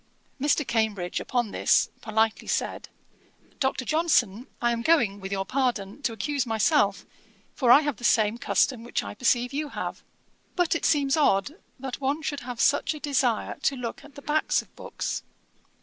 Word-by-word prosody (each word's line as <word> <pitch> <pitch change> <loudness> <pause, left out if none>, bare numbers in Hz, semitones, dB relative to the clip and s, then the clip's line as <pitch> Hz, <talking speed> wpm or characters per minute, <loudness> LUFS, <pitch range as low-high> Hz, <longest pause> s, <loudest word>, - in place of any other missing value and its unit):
Mr. 295 +1 +2
Cambridge, 220 -6 -1
upon 240 -4 -1
this, - - +2
politely 220 0 0
said, - - -2 0.7
'Dr. 265 -1 0
Johnson, 255 - +1
I 240 0 +2
am 230 0 -1
going, 235 -9 +2
with 195 0 -7
your 195 -1 -1
pardon, 245 -2 -1
to 260 - -1
accuse 260 +6 -1
myself, 220 -2 +2 0.5
for 250 - 0
I 275 - +9
have 290 -6 -2
the - - -14
same 225 -1 +3
custom 245 -2 +1
which 240 - -2
I 100 0 -6
perceive 245 - +1
you 295 +1 -2
have. - - -5 0.5
But 355 -2 +2
it 335 - -2
seems 280 -3 +3
odd 290 -2 +2 0.2
that 265 +1 -6
one 280 +4 -1
should 290 -2 -2
have 245 -3 -7
such 285 +4 +2
a - - -8
desire 265 -6 0
to 275 - +1
look 245 +1 -6
at 295 0 -16
the 285 - -11
backs 305 +1 +1
of - - -28
books.' - - -4
250 Hz, 175 wpm, -26 LUFS, 220-290 Hz, 0.7 s, I